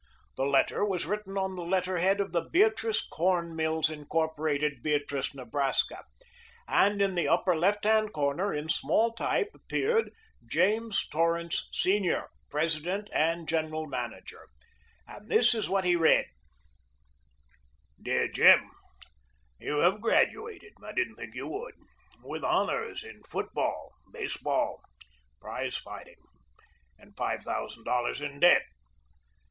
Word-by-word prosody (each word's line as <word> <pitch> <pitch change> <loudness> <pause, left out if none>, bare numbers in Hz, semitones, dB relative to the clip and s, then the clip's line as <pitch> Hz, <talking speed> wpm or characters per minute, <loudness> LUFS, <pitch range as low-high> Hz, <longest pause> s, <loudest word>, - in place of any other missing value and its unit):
The 135 - -1
letter 140 +7 +2
was 190 -6 0
written 200 +1 -4
on 190 -1 -1
the 180 - -5
letterhead 185 +2 +1
of 200 - -1
the 170 - +1
Beatrice 340 - +2
Corn 170 -1 0
Mills, 160 0 +1
Incorporated, 150 -2 -1
Beatrice, 145 -2 -1
Nebraska, 135 +2 -1 0.6
and 205 +1 +3
in 195 -1 +1
the 175 -2 0
upper 180 -2 +3
left 200 +6 +1
hand 215 0 +3
corner, 155 +7 0
in 150 +1 -3
small 225 +7 +2
type, 410 - -1
appeared 455 +1 0 0.3
"James 220 +2 +1
Torrance, 165 +1 0
Sr., 190 -1 +1 0.2
President 165 +6 -1
and 165 +1 +1
General 155 -1 -1
Manager," 125 -5 -6 0.6
and 210 - -13
this 240 +2 +5
is 220 -2 -2
what 195 -1 +1
he 175 -1 +4
read: 165 -2 +4 1.8
Dear - - +1
Jim - - +6 0.9
You 150 - -1
have 190 +4 +3
graduated 435 - 0
I - - -8
didn't 370 -1 0
think - - -10
you - - -5
would 460 +5 -6 0.5
with - - -6
honors 455 -1 0
in 445 - -12
football, - - -3 0.2
baseball, 385 - -2 0.6
prize - - -4
fighting, - - -10 0.8
and - - -20
five - - -2
thousand - - -5
dollars 125 +2 -1
in 145 -1 -6
debt. 175 +2 +6
175 Hz, 125 wpm, -29 LUFS, 155-210 Hz, 1.8 s, Jim